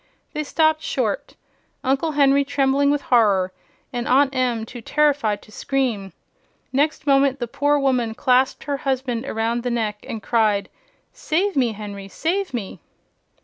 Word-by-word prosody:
They 305 - -2
stopped 315 +1 +2
short, 225 -10 -2 0.5
Uncle 275 +5 0
Henry 280 -1 +4
trembling 275 0 +2
with 290 0 +1
horror 200 -6 +3 0.4
and 245 0 -3
Aunt 275 +1 +4
Em 245 -4 0
too 240 +1 -9
terrified 280 -6 +1
to - - -18
scream. 235 -8 -2 0.6
Next 290 +1 +1
moment 275 -1 +3
the 240 -3 -3
poor 290 +5 +1
woman 250 -5 +1
clasped 255 +2 +2
her 285 -1 -2
husband 260 -2 -2
around 230 +1 -1
the 245 - -2
neck 220 -3 -2
and 220 -2 -5
cried: 215 -4 +1 0.4
"Save 380 +5 -1
me, 245 -5 +2
Henry, 200 -2 -8
save 365 - -2
me!" 230 -7 -5
260 Hz, 145 wpm, -22 LUFS, 225-280 Hz, 0.6 s, Henry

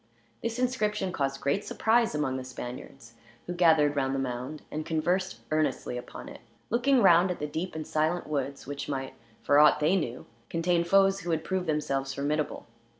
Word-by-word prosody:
This 230 0 -3
inscription 210 -6 0
caused 135 -3 -2
great 140 +9 0
surprise 225 -4 +2
among 135 -3 -1
the 130 - -5
Spaniards, 125 -1 -9 0.3
who 175 - -4
gathered 160 -4 +4
round 135 -1 0
the - - -1
mound 130 +3 -4
and 155 +1 -3
conversed 175 +4 -1
earnestly 155 -5 0
upon 125 - -8
it; - - -11 0.3
looking 245 +2 +3
round 175 0 +6
at 180 - -2
the 150 - -3
deep 160 +5 -4
and 155 -1 -4
silent 155 +3 0
woods, 140 -2 -3
which 145 +1 -5
might, 135 -2 -3 0.3
for 145 - +4
ought 150 0 +6
they 155 +5 +3
knew, 125 -10 -3 0.2
contain 170 +1 +1
foes 195 +2 +4
who 175 - -6
had 160 -1 0
proved 185 0 -2
themselves 135 -3 -1
formidable. 150 +2 -2
155 Hz, 180 wpm, -28 LUFS, 140-185 Hz, 0.3 s, round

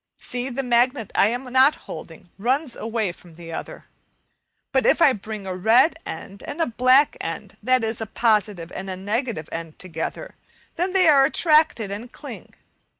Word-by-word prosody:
See! 250 +1 -3
the 270 +2 -3
magnet 245 -2 +1
I 195 - +4
am 245 +4 -2
not 265 +3 +6
holding 180 -5 -10
runs 255 +5 0
away 220 -4 -2
from 175 -1 -17
the 165 0 -9
other. - - -7 0.9
But 265 -1 +2
if - - +4
I 295 -5 +6
bring 210 -1 -7
a 185 -1 -4
red 230 - +4
end 195 +5 -8
and 295 - -6
a 330 - +3
black 255 +4 +4
end, - - -6
that 255 +2 +2
is, 225 0 -2
a 220 - -3
positive 205 -7 0
and 190 0 -6
a 185 - -3
negative 210 - -2
end 165 -1 -6
together, 185 - -5 0.4
then 365 +2 -1
they 370 -3 +4
are 280 -3 +7
attracted 305 - +2
and 225 +5 -7
cling. - - -10
230 Hz, 175 wpm, -23 LUFS, 195-265 Hz, 0.9 s, are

